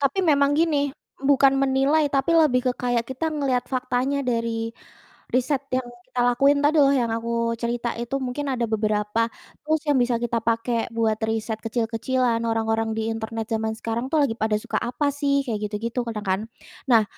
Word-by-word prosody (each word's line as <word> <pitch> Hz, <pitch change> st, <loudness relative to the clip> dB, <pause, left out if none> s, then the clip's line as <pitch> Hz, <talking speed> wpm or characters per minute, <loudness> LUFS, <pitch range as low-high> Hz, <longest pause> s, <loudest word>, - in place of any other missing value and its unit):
tapi 275 Hz, +7 st, +1 dB
memang 280 Hz, -1 st, +4 dB
gini, 295 Hz, -4 st, +2 dB, 0.4 s
bukan 275 Hz, -1 st, +5 dB
menilai, 275 Hz, +3 st, +2 dB
tapi 275 Hz, +4 st, +1 dB
lebih 300 Hz, -6 st, +4 dB
ke -, -, +2 dB
kayak 245 Hz, -2 st, 0 dB
kita 265 Hz, +5 st, -2 dB
ngelihat 275 Hz, -5 st, 0 dB
faktanya 255 Hz, +1 st, 0 dB
dari 230 Hz, -1 st, -1 dB, 0.6 s
riset 260 Hz, +2 st, +1 dB
yang 255 Hz, -1 st, -2 dB, 0.2 s
kita 255 Hz, -1 st, -3 dB
lakuin 275 Hz, +4 st, +4 dB
tadi, 300 Hz, +2 st, +4 dB
loh, 275 Hz, 0 st, +5 dB
yang 250 Hz, -4 st, +1 dB
aku 230 Hz, 0 st, -1 dB
cerita, 235 Hz, 0 st, -1 dB
itu 240 Hz, +3 st, -4 dB
mungkin 260 Hz, +3 st, -3 dB
ada 240 Hz, -2 st, -1 dB
beberapa 215 Hz, 0 st, 0 dB, 0.4 s
tools 310 Hz, 0 st, +1 dB
yang 290 Hz, -, +4 dB
bisa 245 Hz, -1 st, +1 dB
kita 235 Hz, 0 st, 0 dB
pakai 230 Hz, 0 st, 0 dB
buat 220 Hz, -1 st, +2 dB
riset 220 Hz, 0 st, -2 dB
kecil-kecilan, 235 Hz, +2 st, 0 dB
orang-orang 225 Hz, 0 st, 0 dB
di 225 Hz, -, -1 dB
internet 225 Hz, 0 st, -4 dB
jaman 220 Hz, 0 st, 0 dB
sekarang, 230 Hz, +3 st, -3 dB
tuh, 315 Hz, -, +3 dB
lagi 245 Hz, -6 st, +1 dB
pada 220 Hz, -1 st, +1 dB
suka -, -, -3 dB
apa, 250 Hz, +5 st, -1 dB
sih, 285 Hz, -1 st, 0 dB
kayak 225 Hz, -4 st, -2 dB
gitu-gitu, 225 Hz, +4 st, -4 dB
kadang, 215 Hz, -2 st, -5 dB
kan. 190 Hz, +1 st, +1 dB, 0.5 s
Nah, 230 Hz, -3 st, +7 dB
245 Hz, 175 wpm, -24 LUFS, 225-275 Hz, 0.6 s, Nah